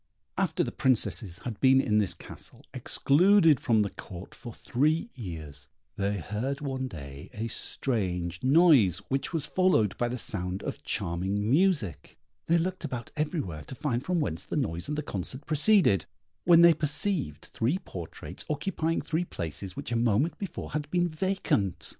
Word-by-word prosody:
After - - 0
the - - -3
Princesses 110 -7 +1
had 115 -5 -5
been 130 0 +5
in 110 -5 +2
this 95 -5 0
castle, - - -9
excluded 165 - +4
from 115 -5 +2
the 100 - -3
Court 95 -1 -10
for 120 -2 -9
three 155 - 0
years, 80 - -8 0.3
they 100 +1 -1
heard 110 - -3
one 135 -3 -3
day 70 - -9
a 110 +2 -3
strange 90 -8 -2
noise, 135 - +5
which 135 0 -1
was 160 -4 -1
followed 145 - +2
by 120 - +1
the 125 +1 -3
sound 95 -4 -2
of - - -5
charming 95 +5 -1
music; 145 - +1 0.3
they 170 - +4
looked 185 +2 -2
about 125 -6 -5
everywhere 150 - -2
to - - -8
find 125 -2 -2
from 180 +1 0
whence 85 - -2
the - - -5
noise 85 - -2
and 150 +1 -3
the 150 - -2
concert 130 - -5
proceeded, 155 - +4 0.4
when 170 -1 +7
they 170 0 +8
perceived 150 - 0
three 125 +10 +1
portraits 90 - -8
occupying 165 +1 -1
three 165 +2 -1
places 90 - -6
which - - -6
a - - 0
moment 120 +7 +2
before 195 -5 -6
had 150 -1 -3
been 175 0 +1
vacant. 155 - -1
130 Hz, 165 wpm, -28 LUFS, 100-160 Hz, 0.4 s, they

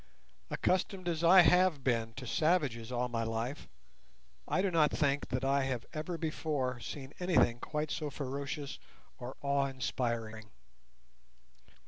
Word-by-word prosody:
Accustomed 185 0 0
as 165 -1 -1
I 180 +2 +9
have 180 -5 +4
been 115 -3 0
to 135 - -7
savages 130 -4 +1
all 125 0 0
my 115 -1 -2
life, 115 +5 -3 0.8
I 185 - +1
do 195 - +1
not 155 -3 +4
think 145 -1 0
that 130 +1 -2
I 135 0 +2
have 130 -3 -2
ever 160 +3 -3
before 150 -6 -2
seen 135 +3 -7
anything 175 -10 +3
quite 150 +2 -3
so 150 -2 -2
ferocious 140 +1 -5 0.4
or 125 +1 -7
awe 140 0 +2
inspiring. 115 -4 -3
140 Hz, 135 wpm, -33 LUFS, 125-160 Hz, 0.8 s, I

